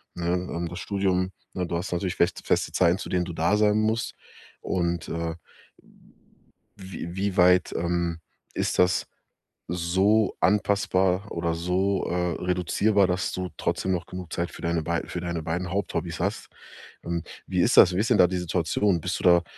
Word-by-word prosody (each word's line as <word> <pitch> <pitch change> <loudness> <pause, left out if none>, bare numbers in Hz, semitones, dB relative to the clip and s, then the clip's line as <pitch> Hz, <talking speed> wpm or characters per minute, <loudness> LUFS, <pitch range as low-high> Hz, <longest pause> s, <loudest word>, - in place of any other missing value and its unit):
ne, 85 -1 -4
ähm, 90 -1 -2
das 90 - -7
Studium 95 -2 0 0.2
ne, 90 -2 -2
du 85 - -3
hast 90 +2 -3
natürlich 90 +1 -2
fest 85 +2 +1
feste - - +1
Zeiten, 90 0 +3
zu - - -7
denen 90 -1 0
du 85 - -6
da 85 +6 +2
sein 105 0 +3
musst, 110 +2 0 0.5
und, 85 -2 -1
äh, 85 0 -3 1.4
w 95 -3 -7
wie 100 0 -1
weit, 90 0 +5
ähm, 85 -1 -1 0.3
ist - - -1
das 90 0 +3 0.6
so 95 +5 +2
anpassbar 95 -1 +2
oder 85 -1 -1
so, 95 +3 0
äh, 90 -1 -1
reduzierbar, 95 +3 +2
dass 90 +1 -1
du 90 -1 -3
trotzdem 95 - -1
noch 85 -1 -2
genug 90 -3 -8
Zeit 85 0 -2
für - - -11
deine 85 -1 0
bei 85 +1 -1
für 90 - -4
deine 85 -2 -3
beiden 85 +2 -3
Haupthobbys 85 -4 -2
hast? 100 +3 -2 0.6
Ähm, 85 -1 -3 0.2
wie - - +1
ist - - +3
das? 90 - +8
Wie - - +1
ist 115 +4 +1
denn 115 - +4
da 90 - +6
die 90 +1 -2
Situation? 90 +1 0
Bist 90 +2 -2
du - - -8
da 85 -1 +6
90 Hz, 180 wpm, -26 LUFS, 85-95 Hz, 1.4 s, das